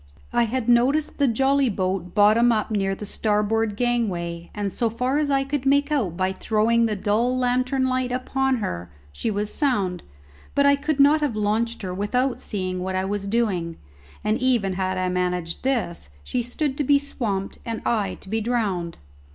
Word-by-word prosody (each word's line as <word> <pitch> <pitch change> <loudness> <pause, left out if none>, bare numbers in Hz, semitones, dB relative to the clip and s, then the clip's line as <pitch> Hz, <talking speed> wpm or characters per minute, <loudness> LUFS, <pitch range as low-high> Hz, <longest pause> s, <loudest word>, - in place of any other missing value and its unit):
I 235 - +3
had 245 +1 -2
noticed 260 +7 +2
the 285 - +4
jolly 270 +3 +2
boat 185 -2 -2
bottom 220 +3 +5
up 220 -1 0
near 195 -2 0
the 210 - -7
starboard 210 +1 0
gangway, 180 -9 -1
and 205 -2 -2
so 230 +5 0
far 250 +5 0
as 300 -1 0
I 275 -1 +2
could 275 0 -2
make 285 +2 +2
out 210 - 0
by 185 0 0
throwing 230 +3 +2
the 215 - -1
dull 220 +6 +1
lantern 255 +1 +1
light 255 -1 0
upon 265 +1 0
her 90 - -4 0.2
she 225 - -3
was 210 0 -1
sound; 200 - 0 0.5
but 280 - +4
I 280 0 +6
could 290 +1 -2
not 290 +2 +5
have 285 -7 0
launched 220 +2 -1
her 185 -1 -3
without 250 +6 0
seeing 185 -3 -3
what 190 +1 -3
I 185 0 0
was 200 0 -3
doing, 195 -7 -1 0.5
and 215 +1 +1
even 240 -7 +1
had 185 0 -1
I 185 0 0
managed 180 -2 -1
this, 235 - -2
she 250 - -1
stood 265 +4 -3
to - - +2
be 285 +1 +5
swamped 220 -9 -3
and 230 -1 -4
I 215 -4 0
to - - -12
be 220 +2 -1
drowned. 205 -8 -1
225 Hz, 185 wpm, -24 LUFS, 195-255 Hz, 0.5 s, I